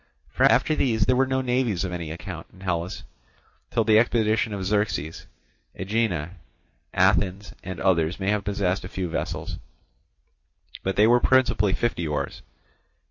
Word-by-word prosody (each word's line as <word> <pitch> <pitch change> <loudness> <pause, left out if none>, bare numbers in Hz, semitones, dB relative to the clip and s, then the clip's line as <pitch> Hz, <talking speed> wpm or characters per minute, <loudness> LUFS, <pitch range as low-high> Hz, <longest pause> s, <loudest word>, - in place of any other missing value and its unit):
For - - +3
after - - +3
these 110 -9 +1
there 130 - +3
were 130 +1 +3
no 130 0 0
navies 125 -7 0
of 90 - -3
any 85 -3 -4
account 85 +1 -7
in 95 - -18
Hellas 90 -2 -3 0.7
till 115 - +1
the 110 0 +5
expedition 110 -2 +1
of 100 -2 -4
Xerxes; 100 -6 -1 0.5
Aegina, 95 -5 -1 0.5
Athens, 95 +1 +1
and 95 -1 -6
others 85 -2 +1
may 95 +1 0
have 105 -1 0
possessed 100 -2 -1
a - - -5
few 95 -1 -3
vessels, - - -4 1.2
but 95 - -2
they 105 - +5
were 120 +2 +5
principally 120 -7 +3
fifty 95 -8 -1
oars. 75 - -3
100 Hz, 150 wpm, -25 LUFS, 90-110 Hz, 1.2 s, the